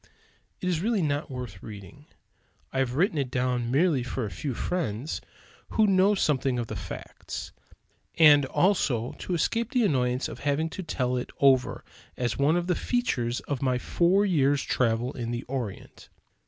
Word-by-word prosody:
It 180 - -2
is 170 -3 0
really 215 -2 +1
not 145 0 -1
worth 125 -8 -7
reading. 110 +8 -11 0.7
I 130 - 0
have 130 -2 0
written 170 +1 +2
it 135 -3 -1
down 125 -1 0
merely 145 +1 +3
for 120 0 -3
a 100 - -5
few 125 - -4
friends 145 - -2 0.5
who 220 - +3
know 195 +1 +4
something 135 -7 +1
of 120 - -1
the 110 - -6
facts; 95 -2 -7 0.7
and 150 -3 +7
also 130 - +1
to 180 - -2
escape 230 +7 0
the 250 -4 +2
annoyance 125 -6 +1
of - - -8
having 145 +3 0
to 190 - -5
tell 125 -7 -1
it 125 - -4
over 135 -2 +3 0.3
as 120 -3 -1
one 145 +4 +3
of 175 - -1
the 180 - +1
features 130 - -1
of 140 -3 -4
my 130 -2 +1
four 180 +9 +2
years' 145 -7 +2
travel 120 0 0
in 120 -4 -4
the 120 0 -3
Orient. 125 -7 -6
135 Hz, 170 wpm, -27 LUFS, 125-175 Hz, 0.7 s, and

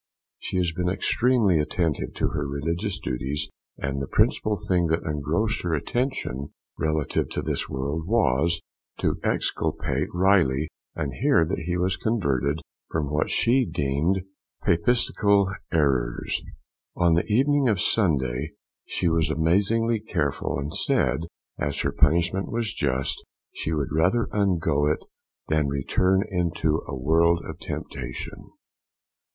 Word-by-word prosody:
She - - -3
has 90 -2 +1
been 90 +2 -1
extremely 110 -2 +2
attentive 80 0 -1
to - - 0
her 75 -1 -2
religious 85 +8 -2
duties, 70 +4 -3 0.3
and 70 -1 -2
the 70 - -3
principal 105 -1 +2
thing 90 -2 +2
that 80 +1 0
engrossed 75 +9 -1
her 85 -2 0
attention 75 - -2 0.2
relative 80 -2 0
to - - -3
this - - -2
world 70 +5 -3
was 85 - +2 0.4
to - - 0
exculpate - - 0
Riley, 90 -6 +3 0.3
and 75 -5 -3
hear 135 - +3
that 80 - -2
he 90 0 0
was 90 +2 0
converted 75 - 0 0.3
from 75 -3 -2
what 75 0 +1
she 130 +3 +3
deemed 75 - 0 0.4
Papistical 100 +1 +3 0.2
errors. 65 -7 +1 0.5
On 85 -1 +3
the 85 - +1
evening 140 +4 +3
of 105 -6 +2
Sunday 75 - +1 0.3
she 90 - -1
was 80 0 +2
amazingly 105 +8 +2
cheerful, 80 -13 -1
and 70 +2 -4
said, 65 +6 +1 0.3
as 70 -1 -1
her - - 0
punishment 85 +6 +2
was 115 -2 -1
just, 65 -1 -1 0.3
she 80 - -3
would 75 -4 -1
rather 90 +10 +2
undergo 85 -8 +2
it 75 - -1 0.4
than 75 -2 +2
return 90 +8 +2
into 85 -4 0
a 70 - -4
world 85 +5 +3
of - - -7
temptation. 65 -2 -6
80 Hz, 135 wpm, -25 LUFS, 70-95 Hz, 0.5 s, Riley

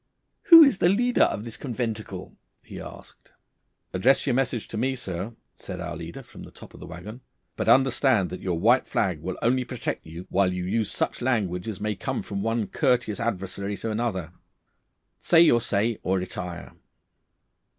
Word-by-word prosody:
'Who 330 -4 +11
is 275 -9 +3
the 175 - +4
leader 245 +6 +3
of 105 - -3
this 115 -1 -7
conventicle?' 110 -7 -5 0.3
he - - -9
asked. - - -13 0.6
'Address 125 +9 +3
your 130 - +1
message 125 -3 -1
to - - -7
me, 130 +2 0
sir,' 100 -1 -5 0.2
said - - -8
our - - -5
leader 85 0 -8
from - - -14
the - - -10
top - - -14
of - - -13
the - - -9
waggon, 105 +8 -9 0.3
'but 110 0 -1
understand 130 -5 +3
that 90 - -6
your 90 -3 -1
white 120 +9 +3
flag 90 -7 0
will 90 +2 -4
only 125 +2 +2
protect 125 -2 -4
you 85 +3 -9
whilst 95 -1 +2
you 90 - -3
use 105 +2 0
such - - -2
language 105 -8 -1
as 110 -3 -5
may 105 +1 -1
come - - -3
from 100 -1 -4
one 115 +1 0
courteous 125 - 0
adversary 100 -2 -3
to 115 - -4
another. 105 -7 -2 0.9
Say 165 -1 +5
your 120 -8 +5
say 110 -1 0
or 95 +1 0
retire. 90 -1 -6
110 Hz, 180 wpm, -25 LUFS, 95-125 Hz, 0.9 s, Who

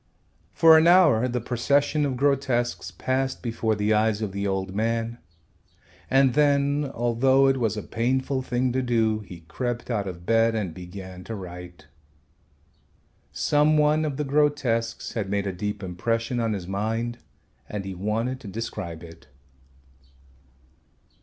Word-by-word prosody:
For 160 -1 +7
an 160 - +3
hour 165 -10 +5
the 125 0 -2
procession 140 +5 +1
of 130 -2 -3
grotesques 135 -3 0
passed 130 +1 -2
before 115 -2 -1
the 105 +1 +1
eyes 110 0 +2
of 105 - -3
the 100 +1 -2
old 95 -1 -2
man, 115 +2 -1 0.9
and 135 -1 +4
then, 145 0 +2
although 125 +3 +2
it 135 0 +2
was 110 -2 0
a 105 - -4
painful 130 +3 -1
thing 125 0 -1
to 130 +2 0
do, 115 -3 +1
he 90 -5 -11
crept 120 +9 -4
out 105 -4 -1
of 85 -2 -8
bed 115 +1 +3
and 100 -7 -2
began 90 +1 -9
to 115 - -5
write. 90 -4 -9 1.5
Some 150 - +2
one 150 +1 +3
of 145 -3 -2
the 150 - -1
grotesques 135 -6 0
had 105 -4 -3
made 100 0 -1
a 95 - -2
deep 105 +2 -4
impression 115 +7 -2
on 115 -2 0
his 95 -4 -5
mind 115 +5 -2 0.5
and 105 -2 -4
he 95 - -5
wanted 110 +7 -2
to 115 - -11
describe 90 -6 -6
it. 85 -1 -13
115 Hz, 150 wpm, -25 LUFS, 100-130 Hz, 1.5 s, For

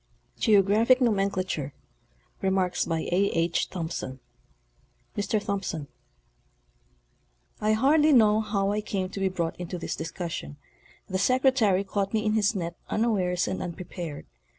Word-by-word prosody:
ete. - - -26
Geographic 215 +4 +5
Nomenclature. 195 - 0 0.7
2TT 175 -5 0 1.0
Mr. 205 +1 0
Tuomrson: 195 -7 -3 1.7
I 215 +1 +2
hardly 295 +7 +4
know 215 -5 +5
how 200 -2 0
I 210 +1 0
came 195 -3 -3
to 195 - -6
be 195 0 +1
brought 170 -3 -2
into 180 0 -4
this 170 - -4
discussion. 160 - -5 0.5
The 185 - -2
Secretary 255 -5 +3
caught 200 +1 -2
me 215 0 0
in 215 - +2
his 215 0 +2
net 170 -2 -3
unawares 190 -6 +1
and 190 - -3
unprepared. 170 -3 -6
195 Hz, 115 wpm, -27 LUFS, 175-215 Hz, 1.7 s, Geographic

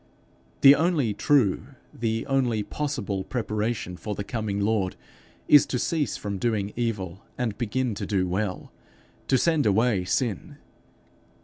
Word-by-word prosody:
The 140 0 +10
only 150 - +1
true, 130 0 +1 0.2
the 115 -1 -2
only 125 -6 +1
possible 125 -9 -3
preparation 110 -5 -3
for 105 +4 -5
the 100 - -4
coming 105 -2 -3
Lord, 100 -2 0 0.5
is 145 - +7
to 125 - -1
cease 150 0 -1
from 100 -2 -4
doing 105 -3 -1
evil, 105 -6 -3
and 115 -5 -1
begin 125 0 -1
to 100 - -5
do 95 -3 +1
well 95 +1 -3 0.6
to 130 - +4
send 160 -3 +2
away 105 -1 +2
sin. 115 0 -2
110 Hz, 135 wpm, -26 LUFS, 100-130 Hz, 0.6 s, The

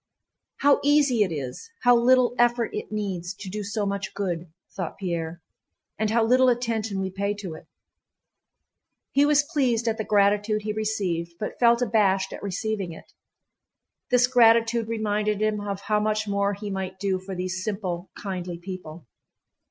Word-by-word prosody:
"How 285 0 +5
easy 285 -5 +4
it 195 -4 +2
is, 140 - -5
how 245 0 +6
little 250 +1 +4
effort 240 -1 +2
it - - -5
needs, 195 -4 -3
to 195 - -8
do 210 +1 -4
so 205 +1 -2
much 200 -1 -3
good," 175 -4 -3 0.2
thought 180 -4 -5
Pierre, 170 -3 -4 0.6
"and 220 -1 +1
how 225 +1 +3
little 255 +2 +5
attention 225 -4 -1
we 190 0 -2
pay 200 +2 -2
to 195 -5 -6
it!" 155 - -12 1.4
He 285 +1 +4
was 295 0 +4
pleased 260 -7 0
at 225 -1 0
the - - 0
gratitude 210 +1 +2
he 215 0 -2
received, 190 -6 -2
but 210 - -5
felt 235 0 +5
abashed 195 -4 +2
at - - -8
receiving 200 -1 -3
it. - - -14 1.0
This 250 0 +5
gratitude 230 -2 +4
reminded 210 -2 -1
him 215 -1 0
of 200 -1 -4
how 210 0 +1
much 215 0 0
more 200 0 0
he 205 0 -6
might 190 -1 -4
do 190 -1 -1
for 190 +1 -7
these 185 +1 -3
simple, 190 -4 -3
kindly 180 -3 -5
people. 175 -3 -8
205 Hz, 165 wpm, -25 LUFS, 190-230 Hz, 1.4 s, how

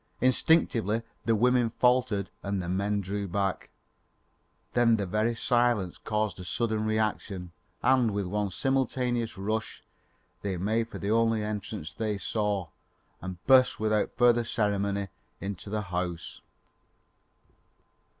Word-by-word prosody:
Instinctively 115 - +2 0.2
the 115 - +3
women 125 +1 +3
faltered 125 -5 +1
and 100 -1 -2
the 90 - -4
men 100 +3 0
drew 100 +1 -3
back; 95 +1 -2 1.0
then 120 -1 +4
the 100 -2 -1
very 110 +5 0
silence 120 -6 +1
caused 105 -2 -2
a - - -6
sudden 110 +2 -1
reaction, 105 -4 -1 0.3
and 130 -3 +4
with 100 -1 -2
one 105 +2 -1
simultaneous 125 -1 0
rush, 110 +3 -3 0.6
they 95 -2 -2
made 110 +5 0
for - - -7
the 100 - -2
only 115 -1 +2
entrance 105 -5 -5
they 105 0 -2
saw 100 -4 -1 0.5
and 95 -1 -7
burst 130 -1 +5
without 110 -1 0
further 120 -1 +5
ceremony 100 -3 -1 0.3
into 100 0 -6
the 105 +1 -1
house. 90 -2 -4
105 Hz, 125 wpm, -28 LUFS, 100-115 Hz, 1.0 s, burst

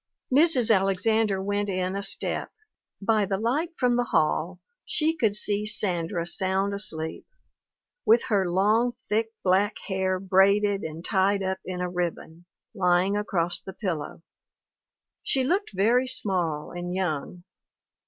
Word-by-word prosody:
Mrs. 265 -6 +5
Alexander 195 +1 +1
went 205 +1 -1
in 185 0 -2
a 200 - -2
step; - - -1 0.5
by 215 +1 +2
the 195 0 -1
light 260 - 0
from 245 -1 +2
the 245 - +1
hall 170 0 0 0.2
she 320 0 0
could 220 -9 +1
see 210 0 0
Sandra 175 -4 -1
sound 190 +2 0
asleep, 160 -6 -4 0.8
with 230 +2 +4
her 195 -5 +1
long, 215 +7 +2
thick, 220 +2 +1 0.2
black 195 +3 +2
hair 190 -1 -1
braided 195 +2 +3
and 160 +2 -7
tied 195 0 +1
up 190 0 -2
in 180 -1 -4
a 180 - -1
ribbon, 175 -1 -4 0.3
lying 185 0 +2
across 175 -5 -1
the 190 - -9
pillow; 165 -6 -4 1.0
she 265 -2 +1
looked 375 +10 0
very 230 +7 +2
small 175 -11 -2
and 175 +1 -5
young. 175 -1 -3
195 Hz, 135 wpm, -26 LUFS, 180-215 Hz, 1.0 s, Mrs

